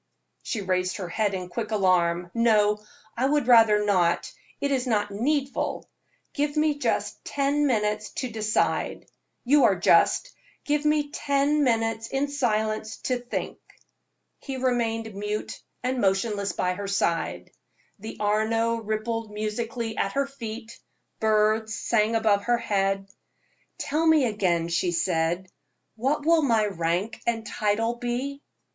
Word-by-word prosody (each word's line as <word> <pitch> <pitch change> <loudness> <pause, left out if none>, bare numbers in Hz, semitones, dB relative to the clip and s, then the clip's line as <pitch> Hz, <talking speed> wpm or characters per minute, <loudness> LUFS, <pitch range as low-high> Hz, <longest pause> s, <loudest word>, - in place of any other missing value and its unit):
She 220 - -3
raised 185 -1 -1
her 185 -4 -5
head 205 +1 0
in 180 -1 -5
quick 210 +5 -4
alarm. 180 -4 +1
"No, 210 -2 +3 0.3
I 255 +3 +1
would 295 -2 +1
rather 225 -4 +6
not, 180 -4 +1 0.3
it 280 - -1
is 260 -2 0
not 205 -3 0
needful. 275 +6 -1 0.5
Give 290 +1 -1
me 300 -1 +2
just - - -1
ten 285 +1 +1
minutes 210 -3 0
to 255 -2 -4
decide. 215 -1 -1 0.4
You 280 +3 +5
are - - +4
just; - - +3 0.3
give 295 0 0
me 300 -1 +2
ten 285 +1 +1
minutes 225 -2 0
in 275 +3 -1
silence 220 -5 -1
to 255 -1 0
think." 245 0 -5 0.8
He 270 -2 -6
remained 230 -3 -1
mute 210 +2 -4 0.2
and 255 0 -1
motionless 200 0 0
by 180 +1 0
her 200 +2 -5
side. 165 - -1 0.5
The 220 +2 -8
Arno 220 +2 +1
rippled 220 +1 -3
musically 220 +2 -4
at 195 - 0
her 280 0 +1
feet; 235 -4 -8 0.4
birds 215 0 +2
sang 225 0 +1
above 210 -3 +2
her 240 0 +3
head. 195 -3 0 0.7
"Tell 315 +3 0
me 315 -4 +5
again;" 185 -7 0
she 175 +1 0
said, 170 +1 0 0.4
"what 275 +6 -1
will 330 0 +5
my 230 -7 +3
rank 185 +3 -2
and 225 -1 0
title 225 +2 0
be?" 250 +4 -3
220 Hz, 140 wpm, -26 LUFS, 205-255 Hz, 0.8 s, rather